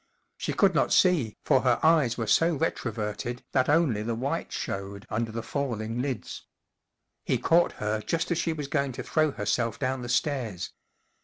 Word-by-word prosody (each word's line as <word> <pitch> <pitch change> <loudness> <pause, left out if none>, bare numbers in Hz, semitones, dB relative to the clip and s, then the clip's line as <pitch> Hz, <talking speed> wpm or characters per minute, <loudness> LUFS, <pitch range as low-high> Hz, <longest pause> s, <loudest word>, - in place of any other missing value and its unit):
She - - -2
could - - +4
not - - +2
see, 160 - +3
for - - +4
her 125 -2 +2
eyes 155 -7 +4
were 115 - -1
so 165 +8 +3
retroverted 120 -4 -3
that 130 0 +2
only 145 -9 +3
the 115 +1 -2
whites 135 +8 -3
showed 100 +1 -5
under 110 +1 -1
the 115 0 -4
falling 120 -3 -2
lids. 130 -3 -5 0.8
He - - +1
caught 170 +1 +3
her 105 0 -2
just 165 +8 -1
as 175 - +1
she 165 - 0
was 150 -3 -4
going 140 -2 0
to - - -6
throw 155 -1 +2
herself 115 -1 -1
down 130 -1 -1
the 120 - -6
stairs. 120 - -1
125 Hz, 175 wpm, -27 LUFS, 110-150 Hz, 0.8 s, could